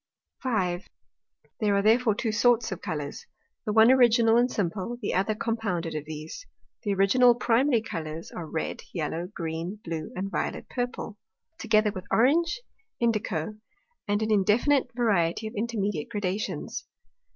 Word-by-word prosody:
5. 190 Hz, -8 st, -1 dB, 0.7 s
There 210 Hz, -3 st, +2 dB
are 200 Hz, -, +2 dB
therefore 225 Hz, 0 st, +4 dB
two 225 Hz, 0 st, -1 dB
sorts 230 Hz, 0 st, +3 dB
of 190 Hz, -, -5 dB
Colours. 150 Hz, -6 st, -5 dB, 0.4 s
The -, -, +1 dB
one 220 Hz, +3 st, +7 dB
Original 235 Hz, -3 st, +5 dB
and 240 Hz, +1 st, +4 dB
Simple, 205 Hz, +3 st, -2 dB
the 210 Hz, -, -2 dB
other 195 Hz, +4 st, +1 dB
compounded 205 Hz, -8 st, -2 dB
of 150 Hz, -1 st, -4 dB
these. 155 Hz, -, -7 dB, 0.4 s
The 205 Hz, -3 st, -1 dB
Original 240 Hz, +6 st, +5 dB
or -, -, -12 dB
Primary 240 Hz, 0 st, +2 dB
Colours 165 Hz, -5 st, -6 dB
are, 170 Hz, -3 st, -6 dB
Red, 160 Hz, -, -3 dB
Yellow, 165 Hz, +1 st, -2 dB
Green, 170 Hz, +2 st, -4 dB
Blue, 160 Hz, -2 st, -4 dB
and 185 Hz, +2 st, -2 dB
a -, -, -4 dB
Violet -, -, -3 dB
purple, 245 Hz, -4 st, -4 dB, 0.4 s
together 215 Hz, -7 st, +3 dB
with 185 Hz, -1 st, -7 dB
Orange, 335 Hz, -, +3 dB, 0.4 s
Indico, 215 Hz, -5 st, -1 dB, 0.5 s
and 205 Hz, +1 st, +1 dB
an 220 Hz, -, -1 dB
indefinite 225 Hz, +8 st, +3 dB
variety 210 Hz, -5 st, +1 dB
of 215 Hz, -, -5 dB
intermediate 205 Hz, -7 st, -2 dB
Gradations. 195 Hz, -4 st, -3 dB
210 Hz, 150 wpm, -27 LUFS, 180-235 Hz, 0.7 s, one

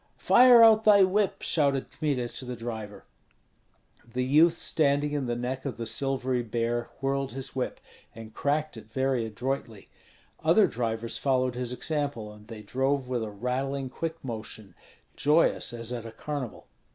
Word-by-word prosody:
"Fire 245 Hz, -1 st, +7 dB
out 220 Hz, -1 st, +6 dB
thy 205 Hz, -2 st, +7 dB
whip!" 195 Hz, +1 st, +1 dB
shouted 140 Hz, -4 st, +1 dB
Kmita 140 Hz, -6 st, -1 dB
to 125 Hz, -, -6 dB
the 125 Hz, 0 st, -5 dB
driver. 110 Hz, -3 st, -7 dB, 1.1 s
The 125 Hz, 0 st, 0 dB
youth 155 Hz, +6 st, +5 dB
standing 145 Hz, -2 st, +1 dB
in 145 Hz, -3 st, -2 dB
the 120 Hz, -, -1 dB
neck 125 Hz, +2 st, -4 dB
of 135 Hz, -, -5 dB
the 115 Hz, -, -4 dB
silvery 130 Hz, +1 st, 0 dB
bear 120 Hz, +1 st, -2 dB
whirled 135 Hz, -1 st, -1 dB
his 135 Hz, 0 st, -6 dB
whip, 130 Hz, -, -3 dB, 0.4 s
and 110 Hz, -1 st, -10 dB
cracked 145 Hz, +1 st, -1 dB
it 110 Hz, -, -12 dB
very 130 Hz, 0 st, 0 dB
adroitly; 115 Hz, -1 st, -5 dB, 0.5 s
other -, -, +5 dB
drivers 115 Hz, -1 st, -2 dB
followed 130 Hz, -2 st, +1 dB
his 125 Hz, -1 st, -3 dB
example, 140 Hz, -6 st, -2 dB
and 105 Hz, 0 st, -16 dB
they 110 Hz, -2 st, -9 dB
drove 130 Hz, +5 st, -1 dB
with 125 Hz, -2 st, -2 dB
a 110 Hz, -, -4 dB
rattling, 130 Hz, +5 st, -3 dB
quick 165 Hz, +2 st, -4 dB
motion, 110 Hz, -4 st, -7 dB, 0.4 s
joyous 150 Hz, -3 st, +2 dB
as 120 Hz, 0 st, -5 dB
at 115 Hz, -2 st, -5 dB
a -, -, -9 dB
carnival. 140 Hz, +1 st, -6 dB
130 Hz, 160 wpm, -27 LUFS, 115-140 Hz, 1.1 s, Fire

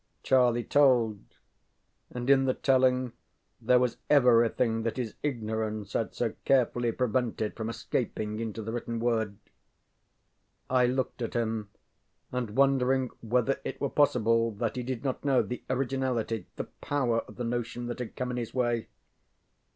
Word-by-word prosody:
ŌĆØ -, -, -46 dB
Charlie 125 Hz, -2 st, +3 dB
told, 125 Hz, -8 st, +3 dB, 0.9 s
and 125 Hz, 0 st, -5 dB
in 135 Hz, -1 st, +5 dB
the 130 Hz, -, +1 dB
telling 130 Hz, -2 st, +2 dB, 0.5 s
there 125 Hz, -, +4 dB
was 125 Hz, -1 st, +1 dB
everything 120 Hz, -4 st, +4 dB
that 115 Hz, +1 st, -2 dB
his 120 Hz, -4 st, -3 dB
ignorance 110 Hz, -6 st, -3 dB
had 115 Hz, -, -1 dB
so 115 Hz, -3 st, -1 dB
carefully 120 Hz, -2 st, +2 dB
prevented 120 Hz, -2 st, -1 dB
from 110 Hz, -1 st, -4 dB
escaping 110 Hz, -2 st, -3 dB
into 110 Hz, -1 st, -4 dB
the 110 Hz, -, -4 dB
written 115 Hz, 0 st, -3 dB
word. 110 Hz, -4 st, 0 dB, 1.3 s
I 125 Hz, -1 st, +4 dB
looked 130 Hz, 0 st, -2 dB
at 115 Hz, -, -3 dB
him, 110 Hz, -3 st, -1 dB, 0.6 s
and 120 Hz, -4 st, -3 dB
wondering 135 Hz, -2 st, +3 dB
whether 125 Hz, +3 st, +1 dB
it -, -, -5 dB
were 140 Hz, -, -1 dB
possible, 115 Hz, -5 st, +3 dB
that 110 Hz, +2 st, -2 dB
he 125 Hz, -, -2 dB
did 125 Hz, 0 st, -4 dB
not 130 Hz, -2 st, -2 dB
know 135 Hz, -3 st, +3 dB
the 125 Hz, -, -5 dB
originality, 130 Hz, -5 st, -1 dB
the -, -, -3 dB
power 125 Hz, -5 st, -1 dB
of -, -, -12 dB
the 125 Hz, -, -4 dB
notion 120 Hz, 0 st, -3 dB
that 120 Hz, 0 st, -5 dB
had 125 Hz, -3 st, -6 dB
come 125 Hz, -1 st, -3 dB
in 125 Hz, -, -3 dB
his 120 Hz, 0 st, -5 dB
way? 120 Hz, -2 st, 0 dB
120 Hz, 155 wpm, -29 LUFS, 115-130 Hz, 1.3 s, in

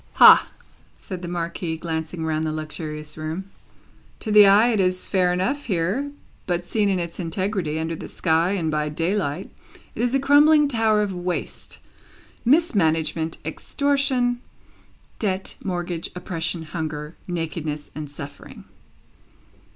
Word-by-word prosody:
"Hah!" -, -, +8 dB, 0.5 s
said 185 Hz, -2 st, -7 dB
the 175 Hz, -, -5 dB
Marquis, 170 Hz, -1 st, -3 dB
glancing 160 Hz, 0 st, -4 dB
round 155 Hz, 0 st, 0 dB
the 155 Hz, -, -1 dB
luxurious 155 Hz, 0 st, -6 dB
room. 165 Hz, +5 st, -5 dB, 0.7 s
"To 215 Hz, -, -3 dB
the 210 Hz, -1 st, +9 dB
eye 210 Hz, +4 st, +6 dB
it 220 Hz, -4 st, +1 dB
is 185 Hz, -1 st, +1 dB
fair 185 Hz, -2 st, +2 dB
enough, 220 Hz, +12 st, -1 dB
here; 200 Hz, +8 st, 0 dB, 0.4 s
but 175 Hz, -1 st, -1 dB
seen 210 Hz, +1 st, +1 dB
in 190 Hz, -, +1 dB
its 170 Hz, 0 st, -4 dB
integrity, 180 Hz, -2 st, -1 dB
under 160 Hz, +1 st, -2 dB
the -, -, -8 dB
sky, 165 Hz, +2 st, +1 dB
and 165 Hz, -5 st, -1 dB
by 150 Hz, 0 st, 0 dB
the 150 Hz, -, -9 dB
daylight, 175 Hz, -1 st, -1 dB, 0.4 s
it -, -, -4 dB
is 245 Hz, +2 st, +1 dB
a -, -, +3 dB
crumbling 295 Hz, +2 st, +6 dB
tower 220 Hz, -5 st, +2 dB
of 200 Hz, -2 st, -3 dB
waste, 180 Hz, 0 st, -4 dB, 0.7 s
mismanagement, 165 Hz, -, +2 dB
extortion, 265 Hz, -, 0 dB, 0.8 s
debt, 190 Hz, -3 st, -2 dB
mortgage, 175 Hz, -2 st, -2 dB
oppression, 170 Hz, -2 st, -3 dB
hunger, 155 Hz, -1 st, -5 dB
nakedness, 160 Hz, -3 st, -4 dB
and 150 Hz, -1 st, -6 dB
suffering." 145 Hz, 0 st, -10 dB
175 Hz, 135 wpm, -23 LUFS, 160-210 Hz, 0.8 s, the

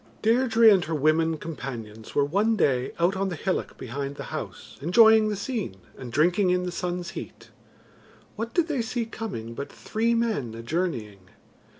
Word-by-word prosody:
Deirdre 230 Hz, 0 st, +4 dB
and 195 Hz, -4 st, +7 dB
her 160 Hz, -, -2 dB
women 155 Hz, +2 st, +2 dB
companions 120 Hz, -9 st, -7 dB
were 140 Hz, -, +4 dB
one 205 Hz, +9 st, +2 dB
day 130 Hz, -9 st, +1 dB
out 175 Hz, +3 st, +2 dB
on 195 Hz, 0 st, -1 dB
the 180 Hz, -, -4 dB
hillock 185 Hz, +4 st, -2 dB
behind 140 Hz, +3 st, -5 dB
the -, -, -6 dB
house -, -, -7 dB
enjoying 220 Hz, +6 st, +6 dB
the 210 Hz, -, -1 dB
scene, 200 Hz, -, -3 dB, 0.2 s
and 125 Hz, -3 st, -8 dB
drinking 180 Hz, -, +3 dB
in 180 Hz, 0 st, +2 dB
the 180 Hz, -, -3 dB
sun's 175 Hz, -1 st, -3 dB
heat. -, -, -9 dB, 0.8 s
What 225 Hz, +2 st, -4 dB
did 340 Hz, +3 st, +1 dB
they 290 Hz, -6 st, 0 dB
see 230 Hz, +1 st, -2 dB
coming 195 Hz, -, -6 dB
but 140 Hz, +4 st, -6 dB
three 230 Hz, +2 st, -1 dB
men 215 Hz, -, -1 dB
a 115 Hz, -, -8 dB
journeying. 115 Hz, -, -3 dB
175 Hz, 175 wpm, -26 LUFS, 140-220 Hz, 0.8 s, and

